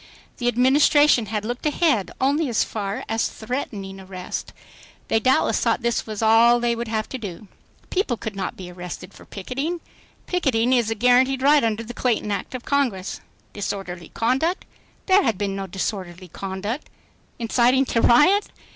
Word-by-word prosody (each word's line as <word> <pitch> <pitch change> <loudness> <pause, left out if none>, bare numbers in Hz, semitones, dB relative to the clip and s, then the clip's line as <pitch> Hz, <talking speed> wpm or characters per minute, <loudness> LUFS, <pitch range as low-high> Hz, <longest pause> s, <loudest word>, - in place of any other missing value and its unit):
The 240 - -2
Administration 260 0 +4
had 210 0 -3
looked 245 +2 -4
ahead 290 - +1
only 280 +3 +1
as 230 - +2
far 205 +4 -4
as 225 0 0
threatening 215 -5 -5
arrest. 185 -1 -6 0.6
They 225 - +3
doubtless 255 +4 +2
thought - - +1
this 235 -1 0
was 215 0 -4
all 230 +2 +6
they 240 0 +1
would 235 0 -4
have 220 -1 -2
to 260 - -5
do. 200 -2 -8 0.4
People 360 - 0
could 220 -3 -6
not 195 -1 -4
be 180 -2 -8
arrested 180 +1 -8
for - - -15
picketing. 275 - -4 0.5
Picketing 260 -9 +1
is 240 -4 +2
a 225 - -1
guaranteed 255 +3 +3
right 290 0 +5
under 225 0 0
the 235 +2 -8
Clayton 230 -4 0
Act 205 - -3
of 250 - -7
Congress. 245 -10 -1 0.3
Disorderly 190 -4 -5
conduct? 270 - 0 0.4
There 385 +1 +5
had 225 - 0
been 200 -1 -2
no 195 0 -4
disorderly 185 -2 -5
I - - -13
conduct. 200 +7 -4 0.5
Inciting 245 +3 +3
to 230 - 0
riot? 365 - +5
230 Hz, 165 wpm, -23 LUFS, 200-260 Hz, 0.6 s, all